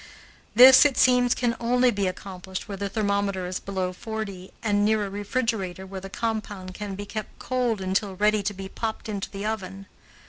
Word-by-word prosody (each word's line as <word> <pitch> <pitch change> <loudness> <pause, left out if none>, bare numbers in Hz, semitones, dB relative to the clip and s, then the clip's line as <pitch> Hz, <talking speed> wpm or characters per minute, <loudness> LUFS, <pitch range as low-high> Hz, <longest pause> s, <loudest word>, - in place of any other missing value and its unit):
This, 255 +3 +10
it 290 -3 +2
seems, 250 -1 +4
can 240 -2 0
only 245 +1 +3
be 200 -3 0
accomplished 185 0 -6
where 200 - -5
the 200 +1 -3
thermometer 200 -3 0
is 180 +1 -3
below 185 -2 -3
forty, 200 -2 -6
and 205 -2 +2
near 215 0 +2
a 195 - -6
refrigerator 205 -3 -2
where 190 0 -7
the 195 - -8
compound 205 -4 -4
can 205 0 -5
be 205 +1 -6
kept 215 +1 -6
cold 245 -5 -1
until 190 +1 -1
ready 210 +2 +2
to 205 +1 -2
be 195 0 -6
popped 220 +3 -4
into 205 -3 -4
the 200 +1 -6
oven. 195 -3 -4
205 Hz, 185 wpm, -25 LUFS, 190-220 Hz, -, This